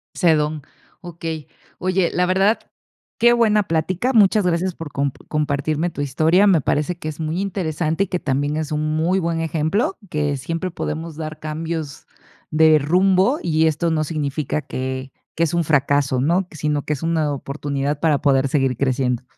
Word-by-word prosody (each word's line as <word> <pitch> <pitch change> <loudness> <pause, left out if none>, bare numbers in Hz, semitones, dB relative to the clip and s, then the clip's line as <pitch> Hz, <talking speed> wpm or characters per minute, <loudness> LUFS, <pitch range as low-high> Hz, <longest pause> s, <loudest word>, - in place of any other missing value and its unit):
Ese 170 -3 +4
don, 150 0 -1 0.4
okey, 165 -4 -6 0.3
oye, 185 -1 +1
la 180 - +2
verdad, 195 +4 +2 0.6
qué 240 +1 +5
buena 220 -3 +3
plática, 185 +8 0
muchas 210 -2 +4
gracias 180 +1 0
por 160 -3 -8
com 140 0 -1 0.2
compartirme 150 +2 0
tu 145 - -6
historia, 160 +8 +3
me 185 -5 +5
parece 150 +5 -1
que - - -6
es 155 +1 -5
muy 160 +3 -2
interesante 175 -3 -1
y - - -4
que 180 -1 -2
también 145 +1 -1
es 155 -1 -3
un 155 0 -1
muy 175 +4 +1
buen 165 -2 -1
ejemplo, 165 +6 0
que 145 -2 -1
siempre 165 +7 -3
podemos 165 -1 -5
dar 155 0 -6
cambios 155 -1 -5 0.4
de 155 0 +5
rumbo 185 - +3
y 160 -1 +2
esto 160 +2 0
no 155 -1 +1
significa 150 -1 -2
que 130 -1 -5 0.2
que 165 - 0
es 165 - 0
un 170 0 +2
fracaso, 140 -3 +2
¿no? 170 +8 +2
Sino 150 -2 -2
que - - -4
es 150 -1 -3
una 160 -3 +1
oportunidad 140 +1 -3
para 155 -4 +2
poder 135 -2 +2
seguir 135 -3 +1
creciendo. 130 -1 0
155 Hz, 175 wpm, -21 LUFS, 145-175 Hz, 0.6 s, qué